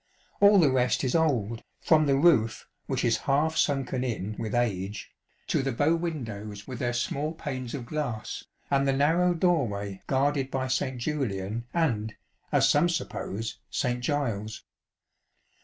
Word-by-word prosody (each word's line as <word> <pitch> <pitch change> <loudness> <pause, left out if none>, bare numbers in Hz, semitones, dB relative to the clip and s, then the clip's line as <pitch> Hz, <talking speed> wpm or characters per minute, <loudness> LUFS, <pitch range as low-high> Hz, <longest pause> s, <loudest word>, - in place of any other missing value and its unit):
All 205 0 +7
the 155 -7 +5
rest 125 +1 +2
is 130 - 0
old, 120 -9 +1 0.2
from 155 -2 +4
the 135 - +4
roof 130 -8 +3 0.2
which - - -1
is - - +3
half 155 +4 +2
sunken 135 -4 0
in 110 -4 -3
with 110 0 -3
age, 105 -4 -2 0.3
to - - +1
the 135 0 -1
bow 145 +7 +2
windows 110 -12 -5
with 125 -2 -7
their 120 -1 0
small 140 +5 -2
panes 130 -6 -5
of 125 -4 -6
glass, 125 -6 -4 0.3
and 140 0 +3
the 135 - +3
narrow 165 +6 +3
doorway 110 - 0
guarded 135 0 +1
by 130 -1 -2
St. 130 0 -1
Julian 120 -5 -2
and, 115 -11 0 0.4
as - - +4
some 150 +4 +4
suppose, 115 - -4
St. 125 0 -1
Giles. 115 -7 -2
130 Hz, 150 wpm, -27 LUFS, 115-150 Hz, 0.4 s, All